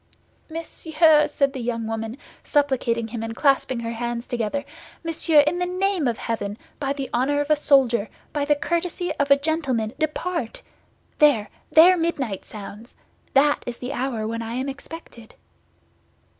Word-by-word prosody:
"Monsieur!" 320 -1 +3
said 275 -1 0
the 265 - -5
young 230 -1 -2
woman, 225 +2 -4 0.3
supplicating 250 -6 +1
him 230 0 -5
and 225 0 -4
clasping 265 -3 +2
her 230 0 -3
hands 235 +1 -3
together, 245 +4 -2 0.4
"monsieur, 325 -2 +4
in 305 +5 0
the 360 - +1
name 365 -4 0
of 235 -2 0
heaven, 210 -2 -3 0.2
by 275 -2 -1
the 275 -1 -3
honor 270 +4 +1
of 290 +1 -1
a - - +7
soldier, 255 -7 +3 0.2
by 290 - 0
the 295 +1 +3
courtesy 345 +3 -2
of 285 - +1
a 280 - +7
gentleman, 280 -7 -1
depart! 310 -4 -2 0.6
There, 280 -9 +4 0.2
there 355 +3 +7
midnight 280 - -2
sounds! 210 +2 -10 0.4
That 290 +2 +4
is 240 -1 -4
the 250 +3 -5
hour 245 -5 -2
when 230 +1 -3
I 230 +1 -5
am 260 +2 -2
expected." 275 -5 -10
275 Hz, 155 wpm, -23 LUFS, 230-305 Hz, 0.6 s, a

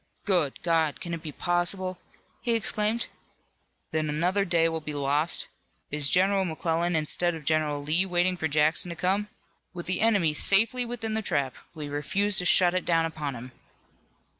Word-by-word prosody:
"Good 175 -9 0
God! 165 -3 +1
can 170 -2 -6
it 165 - -4
be 155 -2 -7
possible!" 180 +2 -1 0.4
he 235 -1 +1
exclaimed, 220 +1 0 0.9
"that 160 - 0
another 175 +6 0
day 170 -2 +2
will 165 -1 -3
be 150 0 -5
lost? 145 +3 +1 0.5
Is 145 -1 +1
General 190 +1 +3
McClellan 170 0 -1
instead 165 +2 0
of 155 -2 -10
General 150 -2 0
Lee 165 +6 +3
waiting 180 0 +1
for 160 -3 -2
Jackson 155 +4 +2
to 170 - -5
come? 195 +5 0 0.5
With 175 - -5
the 185 +1 +1
enemy 200 -9 +3
safely 225 +9 +3
within 225 -2 -4
the 220 - 0
trap, 140 - 0 0.2
we 150 -2 -6
refuse 190 +8 +1
to 180 - -2
shut 180 0 +5
it 185 - 0
down 165 -1 +2
upon 150 -4 -4
him!" 125 +2 -9
170 Hz, 170 wpm, -27 LUFS, 155-190 Hz, 0.9 s, shut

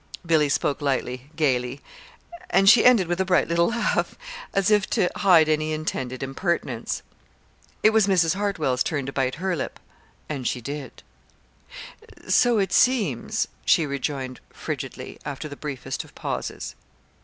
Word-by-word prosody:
Billy 155 -3 +3
spoke 140 +1 0
lightly, 130 -1 -2
gayly; 130 -4 0 0.7
and 195 - +3
she 220 +3 +8
ended 240 -7 +6
with 175 +2 0
a - - +1
bright 180 -2 +3
little 170 +1 +2
laugh, 235 0 0 0.4
as 195 +1 +1
if 210 -2 +3
to 180 - +1
hide 175 -6 +5
any 155 0 0
intended 130 -5 -3
impertinence. 170 +6 -2 0.8
It 215 - +6
was 220 -2 +3
Mrs. 175 -4 +3
Hartwell's 175 -11 -1
turn 140 0 0
to 135 - -5
bite 130 -1 0
her 185 +3 -1
lip 140 - -5 0.5
and 135 -5 -3
she - - -1
did 140 +4 -5
it. - - -20 1.3
"So 240 -2 +4
it 195 -3 0
seems," 210 - +2 0.2
she 165 - +4
rejoined 140 -2 -4
frigidly, - - -6
after 140 +2 -5
the 145 - -8
briefest 140 -3 -5
of - - -19
pauses. - - -4
155 Hz, 150 wpm, -24 LUFS, 135-190 Hz, 1.3 s, she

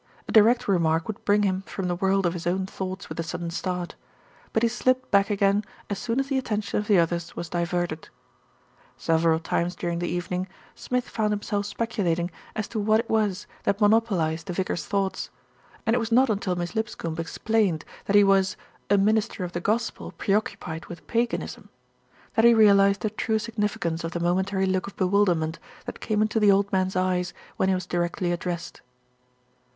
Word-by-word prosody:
A - - -4
direct 230 +3 +5
remark 165 -4 +2
would 220 +1 -6
bring 205 0 +4
him 190 -1 +1
from 190 -2 -4
the 175 - 0
world 195 +1 +1
of 170 - +1
his 175 -1 -5
own 185 +2 0
thoughts 190 0 -5
with - - -7
a - - 0
sudden 170 +1 -4
start; 180 0 -3 0.6
but 220 - +1
he 235 - +4
slipped 255 +2 0
back 200 +1 +4
again 200 0 +2 0.3
as 200 - -2
soon 245 +1 -1
as 270 - +1
the 270 -1 +1
attention 210 -5 -2
of 210 - -4
the 205 - +5
others 170 0 0
was 170 - -5
di 175 +1 0
verted. 175 -2 -2 0.9
Several 165 0 +2
times 170 +2 -1
during 170 -1 -2
the 175 - -2
evening, 180 +1 -2 0.3
Smith 250 0 -2
found 215 -2 -1
him 205 - -3
self 205 -1 -1
speculating 185 -7 -1 0.2
as 215 -2 -2
to 225 - -3
what 215 +1 +3
it 230 - -3
was 210 -4 +1 0.2
that 200 - 0
monopolised 205 -7 +2
the 180 - -3
vicar's 175 -3 -2
thoughts, 195 -1 -1 0.6
and 225 +1 +3
it - - +2
was 230 0 -3
not 255 +1 +5
until 195 -3 -1
Miss 175 0 -3
Lipscombe 210 -7 -3
explained 185 0 0 0.2
that 205 - +1
he 205 - +8
was 195 -1 +3 0.3
"a 205 - +5
minister 215 0 +1
of 175 - -4
the 175 - -4
gospel 220 +5 -1
pre 195 - -1
occupied 165 -6 -2
with 175 - -10
paganism" 235 0 -2 0.6
that 225 - +3
he 235 0 +7
realised 200 -2 +5
the 215 - -1
true 220 +1 0
sig 230 +1 -5
nificance 175 -6 -1
of 165 +1 -4
the 175 - -2
momentary 190 +3 +1
look 185 0 0
of 200 - -9
bewilderment 180 -4 +1 0.3
that - - -7
came 215 -1 +1
into 220 +1 0
the 210 -1 +5
old 200 +1 +2
man's 185 0 +1
eyes 180 -1 0 0.2
when 190 - +2
he 190 - +3
was 185 -1 -3
directly 175 0 -1
ad 175 - -3
dressed. 175 -2 -5
195 Hz, 200 wpm, -26 LUFS, 175-215 Hz, 0.9 s, he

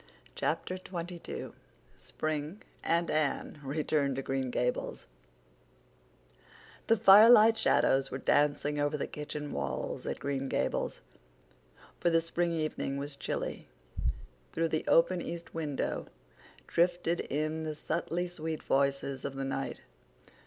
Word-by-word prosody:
Chapter 185 - -2
XXII 175 -2 -6 0.4
Spring 155 +4 -4 0.2
and 170 +1 +1
Anne 155 0 -1
Return 140 -1 0
to 135 - -3
Green 135 -1 -1
Gables 125 0 -2 1.8
The 225 - +5
firelight 220 +2 +8
shadows 135 -10 +3
were 130 - -4
dancing 145 +1 +2
over 145 +1 +1
the - - -2
kitchen 150 0 -6
walls 70 -2 -3
at - - -2
Green 135 -1 -2
Gables, - - -1 1.0
for 175 - +3
the 165 -1 +4
spring 170 +1 -1
evening 155 -3 -2
was 140 +1 -5
chilly; - - -4 0.9
through 165 0 +1
the 155 0 -1
open 175 +2 +4
east 170 0 -6
window 150 -4 -2 0.6
drifted 175 0 +1
in 155 +3 -2
the 155 -1 -3
subtly 170 +3 -2
sweet 160 -2 -4
voices 140 -1 0
of 135 - -4
the 135 0 -3
night. 135 0 -3
155 Hz, 120 wpm, -31 LUFS, 140-170 Hz, 1.8 s, firelight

